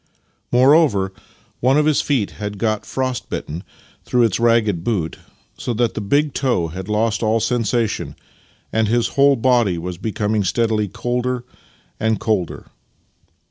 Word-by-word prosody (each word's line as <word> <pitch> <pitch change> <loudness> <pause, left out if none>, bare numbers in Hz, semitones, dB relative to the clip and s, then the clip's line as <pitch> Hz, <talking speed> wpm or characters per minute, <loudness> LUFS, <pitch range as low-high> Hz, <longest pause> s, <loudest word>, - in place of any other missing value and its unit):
More 130 +4 +6
over, 100 -13 +3 0.5
one 130 +3 +3
of 150 - +3
his 155 -2 +3
feet 130 -9 0
had 105 0 -6
got 110 0 -1
frost 130 -2 -3
bitten 80 +4 -5 0.4
through 125 -1 +2
its 110 -3 +1
ragged 115 -7 +2
boot, 90 -8 -2 0.4
so 120 - -2
that 120 0 +1
the - - -4
big 145 +7 +1
toe 120 -11 0
had 95 +4 -7
lost 105 0 +1
all 110 0 +2
sensation 115 -1 -1 0.6
and 110 -1 +2
his 120 +1 +1
whole 140 0 +4
body 115 -6 +2
\vas 85 +1 -5
becoming 105 0 -1
steadily 110 +1 +1
colder 125 +4 -2 0.6
and 110 0 +1
colder. 100 -7 -2
115 Hz, 145 wpm, -20 LUFS, 105-125 Hz, 0.6 s, More